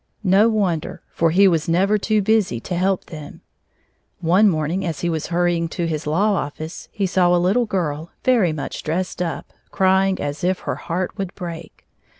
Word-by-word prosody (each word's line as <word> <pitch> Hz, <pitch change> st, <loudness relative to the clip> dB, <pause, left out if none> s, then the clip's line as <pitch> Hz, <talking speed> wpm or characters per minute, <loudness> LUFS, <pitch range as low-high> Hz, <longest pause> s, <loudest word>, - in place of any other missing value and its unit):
No 200 Hz, +3 st, +5 dB
wonder, 190 Hz, -8 st, -1 dB
for 165 Hz, -, +2 dB
he 195 Hz, +5 st, +5 dB
was 165 Hz, -3 st, +1 dB
never 195 Hz, +5 st, +2 dB
too 215 Hz, 0 st, +1 dB
busy 210 Hz, -, +2 dB
to 180 Hz, -, -4 dB
help 185 Hz, +1 st, 0 dB
them. 155 Hz, -3 st, -10 dB, 0.8 s
One 185 Hz, +5 st, +4 dB
morning 165 Hz, +3 st, -1 dB
as 165 Hz, -5 st, -3 dB
he 175 Hz, -, 0 dB
was 160 Hz, -2 st, -3 dB
hurrying 175 Hz, -1 st, +1 dB
to 170 Hz, +1 st, -3 dB
his 155 Hz, -2 st, -3 dB
law 200 Hz, +8 st, +2 dB
office, 155 Hz, -2 st, -5 dB
he 200 Hz, -3 st, -1 dB
saw 180 Hz, -1 st, +3 dB
a -, -, +4 dB
little 195 Hz, +7 st, +2 dB
girl, 165 Hz, -5 st, -2 dB
very 230 Hz, -10 st, +3 dB
much 155 Hz, -2 st, -5 dB
dressed 180 Hz, +3 st, -3 dB
up, 170 Hz, -2 st, -4 dB, 0.2 s
crying 190 Hz, 0 st, +2 dB
as 145 Hz, +2 st, -4 dB
if 185 Hz, +1 st, 0 dB
her -, -, -2 dB
heart 180 Hz, +2 st, -3 dB
would 195 Hz, -2 st, -4 dB
break. 170 Hz, -3 st, -8 dB
180 Hz, 180 wpm, -21 LUFS, 165-195 Hz, 0.8 s, No